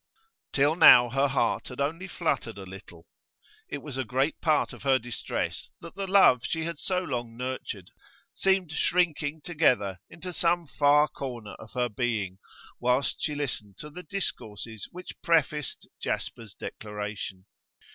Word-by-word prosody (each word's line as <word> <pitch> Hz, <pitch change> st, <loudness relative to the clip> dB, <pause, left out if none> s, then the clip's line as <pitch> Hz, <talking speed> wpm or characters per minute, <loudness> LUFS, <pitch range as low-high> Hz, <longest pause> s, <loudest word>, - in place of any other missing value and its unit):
Till 145 Hz, +3 st, +3 dB
now 120 Hz, -8 st, +9 dB
her 135 Hz, +3 st, +3 dB
heart 135 Hz, 0 st, 0 dB
had 125 Hz, -, -9 dB
only 165 Hz, +6 st, -1 dB
fluttered 160 Hz, -, -1 dB
a 95 Hz, -, -7 dB
little; 90 Hz, -3 st, -12 dB, 0.6 s
it 140 Hz, -, -5 dB
was 145 Hz, -4 st, -6 dB
a 130 Hz, -, 0 dB
great 130 Hz, +5 st, 0 dB
part 155 Hz, -3 st, +2 dB
of -, -, -11 dB
her 135 Hz, -1 st, +4 dB
distress 120 Hz, -2 st, -4 dB
that 170 Hz, -, -10 dB
the 195 Hz, 0 st, -4 dB
love 190 Hz, -10 st, +6 dB
she 160 Hz, 0 st, -1 dB
had 165 Hz, -2 st, -4 dB
so 185 Hz, -1 st, 0 dB
long 120 Hz, -6 st, -4 dB
nurtured 125 Hz, -7 st, -5 dB, 0.4 s
seemed 190 Hz, -4 st, +2 dB
shrinking 160 Hz, -2 st, +1 dB
together 125 Hz, -, +2 dB
into 180 Hz, +2 st, -8 dB
some 170 Hz, 0 st, +2 dB
far 145 Hz, +4 st, +4 dB
corner 120 Hz, -8 st, -6 dB
of 110 Hz, -, -12 dB
her 125 Hz, -1 st, +1 dB
being 105 Hz, -5 st, -2 dB, 0.4 s
whilst 125 Hz, +3 st, +1 dB
she 150 Hz, -, -1 dB
listened 115 Hz, -9 st, -4 dB
to 150 Hz, -, -8 dB
the 180 Hz, +4 st, -8 dB
discourses 115 Hz, -, -4 dB
which 180 Hz, +1 st, -10 dB
prefaced 150 Hz, -3 st, +1 dB
Jasper's 110 Hz, -3 st, -4 dB
declaration. 105 Hz, -3 st, -6 dB
135 Hz, 150 wpm, -28 LUFS, 115-160 Hz, 0.6 s, now